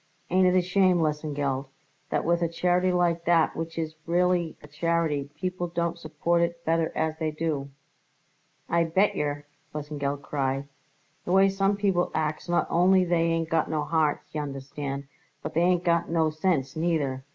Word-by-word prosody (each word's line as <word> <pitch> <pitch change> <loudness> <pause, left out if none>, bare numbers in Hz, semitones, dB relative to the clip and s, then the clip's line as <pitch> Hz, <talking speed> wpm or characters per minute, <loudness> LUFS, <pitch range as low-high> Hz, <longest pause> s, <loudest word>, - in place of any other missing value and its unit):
Ain't 185 +1 +4
it 180 0 +4
a 180 - +3
shame, 185 0 +3
Lesengeld, 145 -3 -1 0.4
that - - -1
with 170 +1 +2
a 170 - +2
charity 180 +2 +1
like 175 -1 +1
that 170 -2 +3
which 165 0 -5
is 160 -1 -2
really 175 -1 +1
a - - -11
charity, 150 -2 -1
people 180 +2 -3
don't 170 0 -2
support 170 +2 0
it 170 0 -2
better 165 0 +1
as 160 0 -1
they 160 -1 0
do?" 150 -3 -2 1.0
"I 170 0 +2
bet 190 +5 +2
yer!" 145 0 -2 0.3
Lesengeld 145 -1 -3
cried. 135 -1 -2 0.6
"The - - -4
way 195 +1 +6
some 195 +1 +1
people 195 -4 +1
acts 155 +2 -2
not 175 - +2
only 185 +2 +4
they 170 -1 +2
ain't 165 -1 0
got 160 -1 +1
no 155 -1 0
hearts, 155 -1 0
y'understand, 140 -1 -4 0.4
but 155 - -5
they 165 - +2
ain't 175 0 +3
got 170 -1 +1
no 160 -2 +2
sense, 155 -4 0
neither. 155 -5 -1
165 Hz, 170 wpm, -27 LUFS, 150-175 Hz, 1.0 s, way